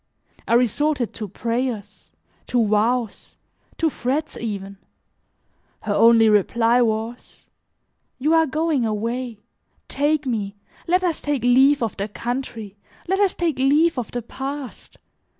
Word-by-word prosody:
I 235 - +3
resorted 250 +1 +1
to 215 - -6
prayers, 230 0 -4 0.4
to 240 -2 +2
vows, 220 +2 -1 0.4
to 325 - +2
threats 280 +6 -2
even; 200 -3 -5 1.0
her 210 - -2
only 225 +1 +6
reply 230 +3 +3
was, 225 +1 -3 0.7
"You 300 +5 +1
are 325 -1 +4
going 310 -1 0
away, 230 +2 -2 0.5
take 295 +1 0
me, 210 -5 -2 0.3
let 365 +2 +2
us 340 -4 -1
take 290 -4 -2
leave 265 +2 +4
of 225 - -3
the 200 +1 -2
country, 225 -2 -5 0.3
let 385 +2 0
us 400 -2 +2
take 325 -6 -1
leave 290 +3 +3
of 240 - -5
the 245 -1 -5
past. 270 +2 -7
245 Hz, 130 wpm, -22 LUFS, 220-285 Hz, 1.0 s, only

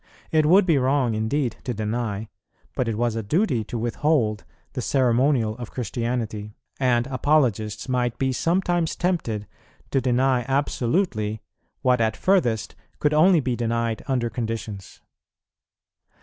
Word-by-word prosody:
It 155 -1 +3
would 185 +4 +6
be 160 -6 +3
wrong 130 -2 +2
indeed 115 +3 -1
to 125 - -3
deny, 110 0 -2 0.5
but 125 - 0
it 110 -2 -1
was 120 -1 0
a 115 - -1
duty 130 - +1
to 120 - -5
withhold, 115 -2 0 0.3
the - - -3
ceremonial 125 -3 +2
of 120 -2 -7
Christianity; 115 -3 -3 0.2
and 120 -3 +2
Apologists 130 -6 +1
might 125 -2 0
be 130 -1 0
sometimes 175 +2 0
tempted 150 - -1 0.5
to 135 - +2
deny 130 0 +2
absolutely 130 - 0 0.4
what 125 -2 +3
at 110 -1 +1
furthest 125 - +1 0.2
could 150 0 +1
only 165 +2 +5
be 125 -2 -1
denied 115 -1 -1
under 125 -4 0
conditions. 110 -4 -5
120 Hz, 135 wpm, -24 LUFS, 115-140 Hz, 0.5 s, would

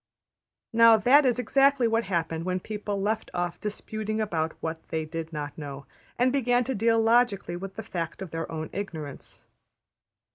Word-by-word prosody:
'' - - -65 0.3
Now 230 0 +7
that 265 +6 +5
is 245 - +2
exactly 270 +1 +3
what 225 0 +1
happened 165 -3 -1
when 185 +1 -1
people 205 0 -4
left 215 +3 -1
off 175 -1 -2
disputing 215 +1 -3
about 165 -7 -1
what 160 0 -4
they 160 -1 -2
did 165 +1 -6
not 150 -2 -5
know, 140 -2 -7 0.3
and 250 +1 +3
began 245 -2 +2
to 265 - -2
deal 225 +1 +2
logically 225 -5 +2
with 195 +2 -7
the 220 - -5
fact 170 -1 -4
of 180 - -9
their 165 0 -4
own 160 -1 -5
ignorance. 160 -8 -7
200 Hz, 175 wpm, -27 LUFS, 165-230 Hz, 0.3 s, Now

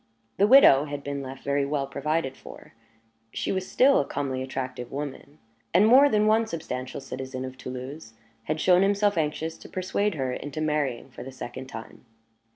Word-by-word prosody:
The 200 - +4
widow 210 - +7
had 145 -1 -6
been 140 0 -4
left 135 0 -8
very 140 0 +1
well 140 0 -1
provided 140 +1 -2
for - - -13 0.6
she - - -2
was 190 -1 -2
still 275 +2 +5
a - - +2
comely, 135 -2 -3
attractive 130 -2 -5
woman 145 +1 -6 0.4
and 190 +4 +6
more 265 +6 +7
than 210 -3 +2
one 220 +1 +3
substantial 130 -9 -5
citizen 130 -1 -6
of 130 0 -8
Toulouse 130 -1 -8 0.3
had 155 +1 -2
shown 180 +3 +5
himself 200 +1 +2
anxious 160 0 -2
to - - -12
persuade 190 +1 -1
her 130 -3 -2
into 145 +3 -6
marrying 145 -5 -1
for - - -10
the 135 - -8
second 130 0 -8
time. 115 -3 -10
145 Hz, 175 wpm, -26 LUFS, 130-180 Hz, 0.6 s, widow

